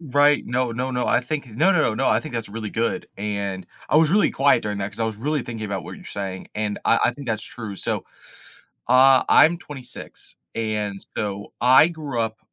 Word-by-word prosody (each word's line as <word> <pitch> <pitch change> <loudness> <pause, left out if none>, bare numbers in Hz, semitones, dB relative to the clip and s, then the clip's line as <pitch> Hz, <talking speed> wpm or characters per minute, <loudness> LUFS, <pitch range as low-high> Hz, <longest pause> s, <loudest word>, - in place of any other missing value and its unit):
right, 145 -1 +3
no, 125 0 -1
no, 125 +3 -2
no, 125 -1 -1
I - - +3
think, 140 +2 -4
no, 155 - +2
no, 175 - +3
no, 110 - +1
no, 135 - 0
I - - +3
think 155 -5 -8
that's 115 -2 -3
really 110 0 -6
good, 115 +3 -1
and 100 -2 -3 0.2
I - - +3
was 155 -1 +5
really 205 +3 +4
quiet 140 +1 +3
during 105 -1 -3
that 95 +1 -3
'cause - - -10
I - - +2
was 110 -1 -3
really 145 +5 -1
thinking 115 -2 -6
about 100 -2 -4
what - - -8
you're - - -14
saying, 95 -2 -6
and 105 -1 -2
I 115 - +4
I 120 - +3
think 140 +2 -10
that's 110 -1 -1
true, 110 -5 -7
so, - - -3 0.8
uh, 130 +1 +6
I'm 170 +2 +6
26, 135 -6 -11 0.2
and 105 -3 -2 0.2
so 100 -1 -4
I 130 +6 +6
grew 150 -8 -4
up 110 -1 -2
115 Hz, 220 wpm, -23 LUFS, 105-140 Hz, 0.8 s, uh